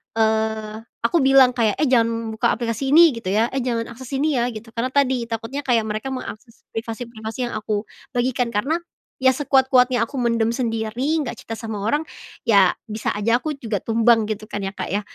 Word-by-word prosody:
eee, 220 -1 0 0.2
aku 235 +9 +2
bilang 270 -1 +7
kayak, 220 -4 +2
"Eh, 305 - +3
jangan 230 -2 +1
buka - - +2
aplikasi 240 +3 -2
ini 330 0 +8
gitu 190 -5 -3
ya," 220 +3 +3
"eh, 270 - -2
jangan 230 -2 -1
akses 250 +2 -10
ini 290 +2 +1
ya" 235 - +2
gitu 225 +1 -9
karena 235 +2 0
tadi 265 -3 +2
takutnya 230 +5 -4
kayak 235 -3 +3
mereka 215 +4 -3
mengakses 230 -2 -8
privasi-privasi 225 +1 -5
yang - - -7
aku 215 -1 -2 0.3
bagikan 245 -1 0
karena, 270 +10 +1 0.5
ya 260 - +7
sekuat-kuatnya 260 -3 +3
aku 275 - -12
mendem 230 -1 +1
sendiri 235 +5 -1
gak 240 -2 -6
cerita 225 - -6
sama 220 -2 -5
orang, 295 +6 +1 0.4
ya 200 -6 +5
bisa 215 -1 -6
aja 230 +3 +2
aku 310 -1 -3
juga 225 -6 -3
tumbang 225 -1 +3
gitu 215 0 -4
kan 205 - -3
ya, 195 - -2
Kak, - - -4
ya 205 - +1
230 Hz, 190 wpm, -22 LUFS, 220-255 Hz, 0.5 s, ini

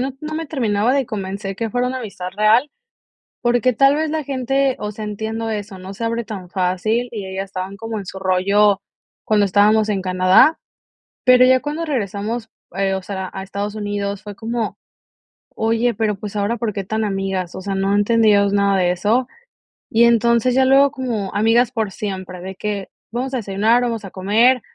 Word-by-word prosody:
no 265 +1 -2
no 310 0 -5
me 325 +1 -3
terminaba 230 -5 +1
de 275 -4 +1
convencer, 195 -1 -5
que 225 -1 -3
fuera 245 +2 0
una 260 +1 -2
amistad 195 -6 -6
real, 225 +7 +4 0.7
porque 245 +1 +2
tal 275 +4 +4
vez 310 0 -1
la 315 0 -1
gente, 270 0 0
o 210 0 -4
sea, 215 +1 -7
entiendo 220 +2 -4
eso, 205 -2 -5
no 185 +1 -8
se 230 - -5
abre 230 0 -1
tan 195 -5 -7
fácil, 195 +6 0
y 205 -4 -5
ellas 190 +1 -4
estaban 190 0 -6
como 225 +1 -5
en 195 - -7
su 190 - -7
rollo 195 +2 +3 0.4
cuando 210 -1 +3
estábamos 210 +3 +3
en 200 -3 -1
Canadá, 185 - +4 0.7
pero 255 -1 +7
ya 255 0 +5
cuando 300 +3 -3
regresamos, 220 - -3 0.3
eh, 195 0 0
o 190 - -3
sea, 190 -1 -5
a 190 - -5
Estados 200 +2 -4
Unidos, 205 -1 -3
fue 205 -1 -8
como, 230 0 -3 0.8
oye, 230 +2 +1
pero, 210 -1 0
pues, 205 +1 -8
ahora, 205 +4 0
¿por 225 -1 -2
qué 200 - -3
tan 220 +2 -1
amigas?, 195 -3 -2
o - - -6
sea, 195 0 -3
no 195 +1 +1
entendíamos 205 -1 +3
nada 200 -1 +3
de 180 -1 +2
eso. 215 +8 +1 0.6
Y, 230 +1 +5
entonces, 235 +1 +3
ya 265 - +4
luego 275 +2 +5
como 240 -8 -3
amigas 225 +3 +3
por 220 -5 -2
siempre, 185 -3 -6
de 190 +1 -7
que 205 -1 -4 0.2
vamos 255 +3 -3
a - - +1
desayunar, 215 +3 +2
vamos 230 -3 -2
a 195 - -7
comer, 225 +6 +3
215 Hz, 190 wpm, -20 LUFS, 195-240 Hz, 0.8 s, pero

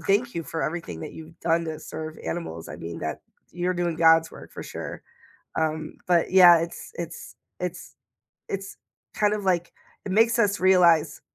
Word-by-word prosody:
thank 225 +5 +1
you 170 - -2
for 160 0 -4
everything 155 - -4
that - - -7
you've 160 +1 -12
done 165 0 +1
to 155 -1 -5
serve 155 0 -7
animals. 85 - -4
I - - -7
mean, 85 0 -7
that 80 -1 -4 0.3
you're 180 +1 -1
doing 175 -2 -1
God's 165 -1 +5
work - - -12
for - - -7
sure, - - -7 0.6
um, 155 -1 -2
but 175 -2 +3
yeah, 175 -2 +9
it's 165 +1 -6
it's 170 -1 -7 0.2
it's 180 0 -5 0.5
it's 195 0 -5 0.4
kind 210 0 +2
of 205 -2 -4
like, 175 -2 +1 0.3
it 195 - -3
makes 230 +3 +4
us 210 -3 +2
realize, 170 -5 +4
170 Hz, 175 wpm, -25 LUFS, 160-185 Hz, 0.6 s, yeah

